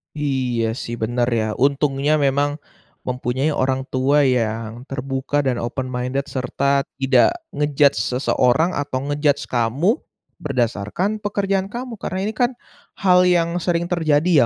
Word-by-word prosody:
Iya 130 Hz, -6 st, -1 dB, 0.2 s
sih 120 Hz, -, -4 dB
bener 120 Hz, +2 st, 0 dB
ya, 110 Hz, -, 0 dB
untungnya 140 Hz, +1 st, +2 dB
memang 145 Hz, 0 st, +1 dB, 0.5 s
mempunyai 125 Hz, +3 st, -1 dB
orang 130 Hz, -2 st, 0 dB
tua 140 Hz, +3 st, +3 dB
yang 115 Hz, -2 st, -1 dB
terbuka, 135 Hz, +2 st, -2 dB
dan 130 Hz, -2 st, +1 dB
open 130 Hz, +2 st, -3 dB
minded, 125 Hz, +2 st, -2 dB
serta 140 Hz, +2 st, 0 dB, 0.2 s
tidak 130 Hz, -2 st, +4 dB, 0.2 s
nge-judge 145 Hz, -1 st, +3 dB
seseorang, 130 Hz, +5 st, +2 dB
atau 140 Hz, -3 st, -2 dB
nge-judge 145 Hz, -1 st, +1 dB
kamu, 130 Hz, -, +1 dB, 0.4 s
berdasarkan 130 Hz, -, -1 dB
pekerjaan 195 Hz, -2 st, 0 dB
kamu. 240 Hz, -1 st, -5 dB
Karena 185 Hz, -, -3 dB
ini 220 Hz, -, -3 dB
kan, 245 Hz, +1 st, +2 dB, 0.5 s
hal 180 Hz, -1 st, +5 dB
yang 170 Hz, -2 st, +3 dB
sering 170 Hz, -1 st, 0 dB
terjadi 160 Hz, -4 st, +3 dB
140 Hz, 130 wpm, -21 LUFS, 125-160 Hz, 0.5 s, hal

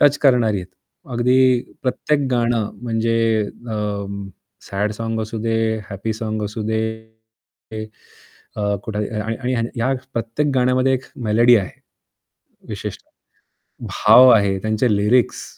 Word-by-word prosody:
Touch 145 Hz, 0 st, +5 dB
करणारी 120 Hz, -6 st, +3 dB
आहेत. 90 Hz, -, -9 dB, 0.4 s
अगदी 125 Hz, +2 st, +2 dB, 0.4 s
प्रत्येक 140 Hz, +2 st, 0 dB
गाणं 120 Hz, -3 st, +1 dB
म्हणजे 115 Hz, -1 st, +1 dB, 0.3 s
अं, 100 Hz, -2 st, -4 dB, 0.4 s
सॅड 105 Hz, +2 st, -1 dB
साँग 115 Hz, +1 st, -3 dB
असू 110 Hz, +1 st, -5 dB
दे, 115 Hz, -1 st, 0 dB
हॅपी 100 Hz, +3 st, -3 dB
साँग 110 Hz, -1 st, -4 dB
असू 105 Hz, +2 st, -5 dB
दे 110 Hz, 0 st, +1 dB, 1.8 s
अ, 100 Hz, -1 st, 0 dB
कुठे 105 Hz, -1 st, -2 dB
आणि 110 Hz, +2 st, -3 dB
आणि 130 Hz, 0 st, -1 dB
आणि 115 Hz, -1 st, -1 dB
या 130 Hz, +4 st, +2 dB, 0.2 s
प्रत्येक 115 Hz, +6 st, -1 dB
गाण्यामध्ये 130 Hz, +1 st, +2 dB
एक 130 Hz, -, -4 dB, 0.2 s
मेलोडी 120 Hz, +3 st, +5 dB
आहे. 95 Hz, -4 st, -1 dB, 1.0 s
विशेषतः. -, -, -7 dB, 0.8 s
भाव 130 Hz, +1 st, +6 dB
आहे 100 Hz, -4 st, +3 dB
त्यांचे 110 Hz, +1 st, +1 dB
लिरिक्स 110 Hz, +4 st, +2 dB
115 Hz, 125 wpm, -20 LUFS, 105-125 Hz, 1.8 s, भाव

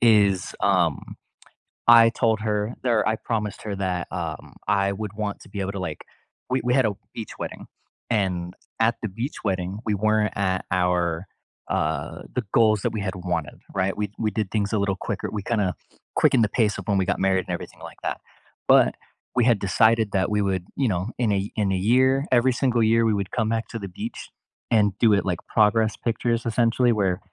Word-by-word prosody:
is, 100 Hz, -5 st, +3 dB
um, 90 Hz, -5 st, +1 dB, 0.7 s
I 115 Hz, -1 st, +8 dB
told 115 Hz, -3 st, +1 dB
her 105 Hz, +1 st, -1 dB
there, 120 Hz, -4 st, +3 dB
I 110 Hz, -, +2 dB
promised 105 Hz, -3 st, -3 dB
her 105 Hz, -2 st, -3 dB
that, 95 Hz, -2 st, -2 dB
um, 80 Hz, -4 st, -5 dB
I 100 Hz, -1 st, +2 dB
would 105 Hz, 0 st, -5 dB
want 105 Hz, -1 st, -3 dB
to -, -, -15 dB
be 100 Hz, 0 st, -6 dB
able 95 Hz, 0 st, -2 dB
to, 100 Hz, -, -5 dB
like 80 Hz, -4 st, -4 dB, 0.5 s
we 130 Hz, -, +1 dB
we 125 Hz, 0 st, +1 dB
had 130 Hz, -3 st, +4 dB
a 105 Hz, -, +1 dB, 0.2 s
beach 110 Hz, -, -6 dB
wedding -, -, -6 dB, 0.5 s
and 90 Hz, -5 st, 0 dB, 0.3 s
at 115 Hz, +1 st, +3 dB
the 110 Hz, -, -2 dB
beach 115 Hz, +9 st, -5 dB
wedding, 95 Hz, 0 st, -2 dB
we 105 Hz, -, +2 dB
weren't 110 Hz, +1 st, +1 dB
at 95 Hz, -2 st, 0 dB
our, 90 Hz, -1 st, +1 dB, 0.4 s
uh, 80 Hz, +1 st, -2 dB
the 125 Hz, -4 st, -1 dB
goals 110 Hz, -3 st, +4 dB
that -, -, +1 dB
we 110 Hz, -, -3 dB
had 95 Hz, 0 st, -3 dB
wanted, 85 Hz, -4 st, -3 dB, 0.2 s
right, 95 Hz, -1 st, 0 dB
we 105 Hz, -2 st, -2 dB
we 110 Hz, -1 st, +1 dB
did 105 Hz, -4 st, -2 dB
things 105 Hz, -1 st, 0 dB
a -, -, +2 dB
little 100 Hz, -1 st, 0 dB
quicker, -, -, -4 dB
we 105 Hz, -, -3 dB
kinda 105 Hz, -6 st, 0 dB, 0.4 s
quickened 120 Hz, -4 st, +4 dB
the 105 Hz, -, +1 dB
pace 105 Hz, -4 st, +1 dB
of 100 Hz, -, -8 dB
when 100 Hz, -2 st, +2 dB
we 95 Hz, -, +1 dB
got -, -, +1 dB
married 95 Hz, -1 st, +2 dB
and -, -, -2 dB
everything -, -, -7 dB
like -, -, -10 dB
that. -, -, -3 dB, 0.5 s
But -, -, +6 dB, 0.4 s
we 120 Hz, -2 st, +3 dB
had 120 Hz, -4 st, +4 dB
decided 110 Hz, +2 st, +3 dB
that 95 Hz, -1 st, +1 dB
we 105 Hz, 0 st, +1 dB
would, 95 Hz, -2 st, -1 dB
you 135 Hz, -, +1 dB
know, 95 Hz, 0 st, -1 dB
in 115 Hz, -4 st, +1 dB
a 100 Hz, +1 st, -1 dB
in 100 Hz, -3 st, +1 dB
a -, -, +1 dB
year, 130 Hz, +8 st, +3 dB
every 125 Hz, +1 st, +4 dB
single 120 Hz, -2 st, +1 dB
year, 115 Hz, +1 st, +4 dB
we 110 Hz, -2 st, +2 dB
would 100 Hz, -1 st, -3 dB
come 110 Hz, -3 st, 0 dB
back 115 Hz, 0 st, -1 dB
to 115 Hz, -, -5 dB
the 100 Hz, -, -6 dB
beach 90 Hz, -, -7 dB, 0.4 s
and 105 Hz, -3 st, +4 dB
do 115 Hz, -, +5 dB
it, 100 Hz, -, +2 dB
like, 90 Hz, -3 st, -1 dB
progress 110 Hz, 0 st, +3 dB
pictures 115 Hz, 0 st, -1 dB
essentially 120 Hz, +1 st, +2 dB
where 95 Hz, -4 st, 0 dB
105 Hz, 210 wpm, -24 LUFS, 95-115 Hz, 0.7 s, I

